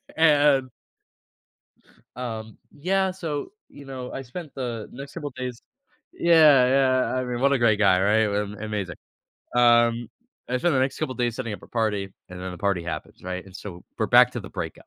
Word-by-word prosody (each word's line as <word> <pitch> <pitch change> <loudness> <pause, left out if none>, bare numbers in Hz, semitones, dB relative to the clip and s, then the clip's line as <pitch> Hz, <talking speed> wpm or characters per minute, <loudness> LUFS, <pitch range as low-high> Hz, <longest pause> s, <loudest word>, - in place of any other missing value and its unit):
And 145 -4 +4 1.5
Um, 110 -3 -6 0.2
yeah, 190 +5 +1
so, 165 - -5 0.2
you 140 - -13
know, 130 -2 -7
I 135 - -5
spent 150 +5 -9
the 120 -5 -4
next 140 +2 -9
couple 145 -4 -5
days 125 -2 -5 0.5
yeah, 155 -6 +6
yeah, 130 -1 +2
I 130 0 -1
mean, 125 -1 -3
what 140 +1 +3
a - - +1
great 110 -3 +3
guy, 95 -3 +4
right? 105 +3 +3
Am 105 0 -2
amazing. 105 -6 -4 0.6
Um, 120 -1 +4 0.4
I 125 0 0
spent 175 +4 +1
the - - +3
next 135 +1 0
couple 130 - -2
days 120 -2 0
setting 115 -4 -4
up - - -7
a - - -12
party, 105 -4 -1 0.2
and 90 0 -9
then 90 0 -5
the - - -8
party 95 -3 0
happens, 85 - -6
right, 90 0 -4
and 95 -2 -15
so 90 -4 -9 0.2
we're - - +1
back - - +6
to - - -4
the - - -9
breakup, - - -6
120 Hz, 190 wpm, -25 LUFS, 105-135 Hz, 1.5 s, yeah